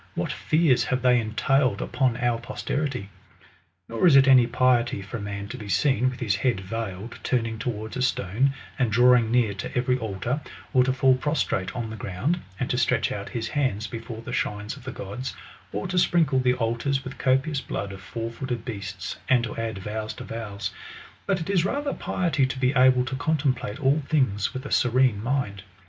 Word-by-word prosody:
what -, -, -1 dB
fears 155 Hz, -6 st, +2 dB
have 130 Hz, -1 st, -1 dB
they 125 Hz, -1 st, +5 dB
entailed 115 Hz, +1 st, +1 dB
upon 130 Hz, -4 st, 0 dB
our 120 Hz, -1 st, +1 dB
posterity! 125 Hz, -3 st, -3 dB, 0.8 s
Nor 115 Hz, +10 st, +2 dB
is 155 Hz, -, +7 dB
it 135 Hz, 0 st, +7 dB
any 130 Hz, -3 st, +7 dB
piety 120 Hz, -2 st, +2 dB
for 100 Hz, +5 st, -6 dB
a -, -, -7 dB
man 100 Hz, 0 st, -5 dB
to 130 Hz, -, -6 dB
be 105 Hz, -2 st, -8 dB
seen, 130 Hz, +2 st, +2 dB
unth 130 Hz, -, -8 dB
his 105 Hz, -4 st, +1 dB
head 120 Hz, -3 st, +1 dB
veiled, 100 Hz, +1 st, -5 dB
turning 115 Hz, -3 st, -1 dB
towards 110 Hz, -2 st, -4 dB
a 130 Hz, -, -2 dB
stone, 130 Hz, +2 st, +1 dB, 0.2 s
and 125 Hz, -4 st, +2 dB
drawing 120 Hz, 0 st, +5 dB
near 115 Hz, -3 st, +2 dB
to 95 Hz, -, -5 dB
every 125 Hz, +1 st, +1 dB
altar; 110 Hz, +6 st, -2 dB, 0.3 s
or 125 Hz, -, +6 dB
to 130 Hz, -, +2 dB
fall 130 Hz, 0 st, +4 dB
prostrate 130 Hz, -, -1 dB
on 115 Hz, -2 st, -3 dB
the -, -, -5 dB
ground, 110 Hz, -, -2 dB, 0.2 s
and -, -, -1 dB
to -, -, +1 dB
stretch -, -, +2 dB
out -, -, -5 dB
his 115 Hz, -1 st, -3 dB
hands 130 Hz, -8 st, 0 dB
before 115 Hz, 0 st, -7 dB
the -, -, -6 dB
shrines 105 Hz, +1 st, -2 dB
of -, -, -14 dB
the 130 Hz, -, -4 dB
gods; 120 Hz, +6 st, -6 dB, 0.4 s
or 105 Hz, -, -3 dB
to 180 Hz, 0 st, +1 dB
sprinkle 160 Hz, -7 st, +3 dB
the 125 Hz, -1 st, +2 dB
altars 125 Hz, +3 st, -1 dB
with 130 Hz, +1 st, -8 dB
copious 135 Hz, +2 st, +1 dB
blood 100 Hz, 0 st, -4 dB
of 95 Hz, -1 st, -9 dB
four 115 Hz, +3 st, -5 dB
footed 120 Hz, -1 st, -4 dB
beasts, 100 Hz, -5 st, -5 dB
and 125 Hz, -2 st, +4 dB
to 115 Hz, -, -4 dB
add 115 Hz, -2 st, -3 dB
vows 105 Hz, +2 st, -4 dB
to -, -, -8 dB
vows; 105 Hz, -3 st, -5 dB, 0.6 s
but 195 Hz, -2 st, +1 dB
it 160 Hz, -, -5 dB
is 190 Hz, -4 st, +2 dB
rather 285 Hz, +8 st, -1 dB
piety 150 Hz, -8 st, 0 dB
to 130 Hz, -, -5 dB
be 130 Hz, +1 st, +2 dB
able 130 Hz, -1 st, +5 dB
to 130 Hz, +1 st, -3 dB
contemplate 140 Hz, -5 st, -1 dB
all 145 Hz, +2 st, +3 dB
things 130 Hz, -10 st, +1 dB
with 130 Hz, +1 st, -6 dB
a -, -, -6 dB
serene 125 Hz, -3 st, +3 dB
mind. 115 Hz, -5 st, -1 dB
125 Hz, 200 wpm, -25 LUFS, 110-130 Hz, 0.8 s, is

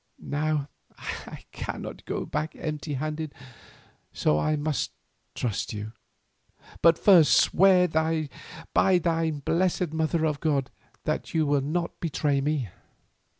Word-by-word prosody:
Now 150 Hz, 0 st, -1 dB, 0.3 s
I -, -, -7 dB
cannot -, -, -6 dB
go -, -, -3 dB
back 155 Hz, +1 st, -3 dB
empty 150 Hz, -1 st, -4 dB
handed, 155 Hz, +2 st, -4 dB, 0.8 s
so 75 Hz, -, +1 dB
I 155 Hz, -, +1 dB
must 150 Hz, 0 st, -1 dB, 0.5 s
trust 115 Hz, -3 st, -2 dB
you. 105 Hz, +1 st, -5 dB, 0.9 s
But 165 Hz, 0 st, +6 dB
first 180 Hz, -7 st, +6 dB
swear 185 Hz, 0 st, +5 dB
by 160 Hz, -1 st, 0 dB, 0.4 s
thine 165 Hz, -5 st, +2 dB
blessed 180 Hz, -1 st, +1 dB
Mother 160 Hz, 0 st, +1 dB
of 150 Hz, -2 st, 0 dB
God 140 Hz, -5 st, 0 dB, 0.3 s
that -, -, -3 dB
you 160 Hz, -1 st, +3 dB
will 145 Hz, -1 st, +2 dB
not 170 Hz, +5 st, -2 dB
betray 145 Hz, -3 st, 0 dB
me." 140 Hz, -6 st, -1 dB
155 Hz, 120 wpm, -27 LUFS, 145-165 Hz, 0.9 s, But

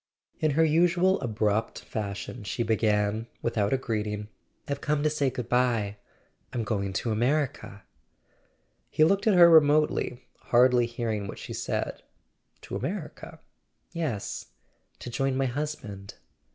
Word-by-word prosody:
In 155 Hz, -, +2 dB
her 160 Hz, -, +5 dB
usual 175 Hz, +4 st, +3 dB
abrupt 110 Hz, -2 st, -1 dB
fashion 105 Hz, +2 st, -5 dB
she 100 Hz, +4 st, -2 dB
began, 110 Hz, -1 st, +1 dB, 0.2 s
without 105 Hz, -3 st, 0 dB
a 135 Hz, -, +3 dB
greeting: 105 Hz, -4 st, -3 dB, 0.4 s
"I've 140 Hz, 0 st, -3 dB
come 150 Hz, -1 st, 0 dB
to 155 Hz, -, +2 dB
say 145 Hz, -3 st, +1 dB
goodbye; 120 Hz, -4 st, 0 dB, 0.5 s
I'm 120 Hz, -3 st, -2 dB
going 100 Hz, -2 st, -2 dB
to 115 Hz, +4 st, -1 dB
America." 120 Hz, -3 st, -1 dB, 1.1 s
He 155 Hz, -, +3 dB
looked 195 Hz, +6 st, +3 dB
at 210 Hz, -, +5 dB
her 175 Hz, -1 st, +9 dB
remotely, 150 Hz, -5 st, +4 dB, 0.2 s
hardly 125 Hz, 0 st, +4 dB
hearing 115 Hz, -4 st, -3 dB
what -, -, -7 dB
she -, -, -7 dB
said. -, -, -3 dB, 0.6 s
"To -, -, -7 dB
America?" -, -, -5 dB, 0.5 s
"Yes; 155 Hz, -, -3 dB, 0.5 s
to 120 Hz, -, -8 dB
join 135 Hz, +2 st, 0 dB
my 135 Hz, -, +1 dB
husband." 125 Hz, -8 st, -5 dB
120 Hz, 130 wpm, -27 LUFS, 105-150 Hz, 1.1 s, her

